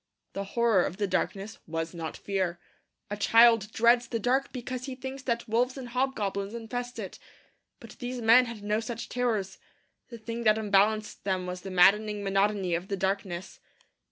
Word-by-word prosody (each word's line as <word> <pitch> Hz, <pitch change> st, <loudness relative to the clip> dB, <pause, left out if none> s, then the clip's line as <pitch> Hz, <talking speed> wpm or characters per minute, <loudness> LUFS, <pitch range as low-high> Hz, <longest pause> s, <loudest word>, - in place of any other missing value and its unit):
The 195 Hz, -, -3 dB
horror 230 Hz, -6 st, +4 dB
of 180 Hz, -, -4 dB
the 210 Hz, -, 0 dB
darkness 200 Hz, +2 st, -2 dB
was 165 Hz, +1 st, -3 dB
not 165 Hz, -2 st, -5 dB
fear. 185 Hz, -3 st, -2 dB, 0.5 s
A -, -, -1 dB
child 225 Hz, 0 st, +5 dB
dreads 235 Hz, +1 st, +4 dB
the 230 Hz, -, -2 dB
dark 255 Hz, +5 st, 0 dB
because 255 Hz, 0 st, -5 dB
he 265 Hz, -2 st, -5 dB
thinks 265 Hz, +1 st, -7 dB
that 235 Hz, -2 st, -2 dB
wolves 245 Hz, +4 st, +1 dB
and 255 Hz, -2 st, -7 dB
hobgoblins 220 Hz, -5 st, -2 dB
infest 245 Hz, +2 st, -5 dB
it. -, -, -7 dB, 0.6 s
But -, -, -12 dB
these 250 Hz, 0 st, -4 dB
men 235 Hz, +2 st, +6 dB
had 230 Hz, -3 st, -8 dB
no 210 Hz, +1 st, 0 dB
such 230 Hz, 0 st, -6 dB
terrors. 220 Hz, -6 st, -1 dB, 0.5 s
The 235 Hz, -, -8 dB
thing 230 Hz, +1 st, -5 dB
that 215 Hz, 0 st, +5 dB
unbalanced 210 Hz, 0 st, +1 dB
them 185 Hz, -2 st, -1 dB
was 180 Hz, 0 st, -5 dB
the 195 Hz, -, -7 dB
maddening 205 Hz, +3 st, +4 dB
monotony 195 Hz, -1 st, +1 dB
of 175 Hz, +3 st, -2 dB
the 195 Hz, -, -2 dB
darkness. 190 Hz, -2 st, -3 dB
215 Hz, 175 wpm, -28 LUFS, 195-240 Hz, 0.6 s, men